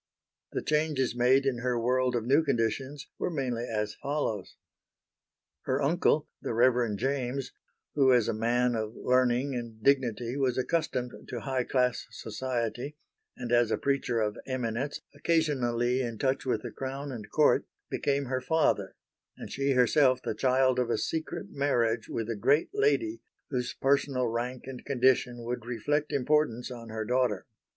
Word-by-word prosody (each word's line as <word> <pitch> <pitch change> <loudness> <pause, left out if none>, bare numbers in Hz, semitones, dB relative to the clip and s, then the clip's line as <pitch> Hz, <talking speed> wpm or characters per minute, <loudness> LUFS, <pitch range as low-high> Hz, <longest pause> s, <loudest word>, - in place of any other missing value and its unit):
The - - -2
changes 150 -5 +1
made 130 +3 +4
in 130 -3 0
her 125 -1 0
world 125 +1 +1
of 115 -2 -1
new 140 +6 +4
conditions 135 +2 -1
were - - 0
mainly 125 -7 -2
as 105 -2 -2
follows: 140 -9 -3 1.1
Her 130 +1 +1
uncle, 150 +1 +2
the - - -3
Reverend 120 -3 +3
James, 135 +1 -2 0.4
who 135 -3 +4
as 120 -3 +4
a - - +1
man 120 +3 +1
of 110 0 -3
learning 125 +2 +2
and 115 -3 -6
dignity 125 -3 +2
was 130 -3 +1
accustomed 130 -3 -1 0.2
to 120 - -5
high 130 -1 -1
class 125 -2 +1
society, 125 +4 -4 0.4
and 120 -1 -5
as 120 -2 +4
a - - +1
preacher 135 -4 0
of 105 -1 -1
eminence 130 +1 -2
occasionally 130 -6 +1
in 120 -3 -3
touch 135 +2 0
with 115 -4 0
Crown 135 +1 -4
and 110 -5 -7
Court, 150 -1 +3 0.2
became 140 0 0
her 130 0 -2
father; 160 +2 +1 0.4
and - - -8
she 140 0 +1
herself 130 +1 +4
the - - -2
child 130 +2 +2
of 125 -1 0
a - - +1
secret 160 0 -3
marriage 120 -5 0
with 115 -2 -3
a 115 - -2
great 140 +9 +2
lady 345 -5 +1 0.3
whose 125 -2 -2
personal 135 -2 +1
rank 120 +2 -3
and 130 -1 -8
condition 125 -2 +2
would 120 0 -3
reflect 145 +6 -1
importance 140 -3 +1
on 115 -2 -8
her 110 0 -4
daughter. 125 -5 +1
125 Hz, 155 wpm, -29 LUFS, 120-140 Hz, 1.1 s, made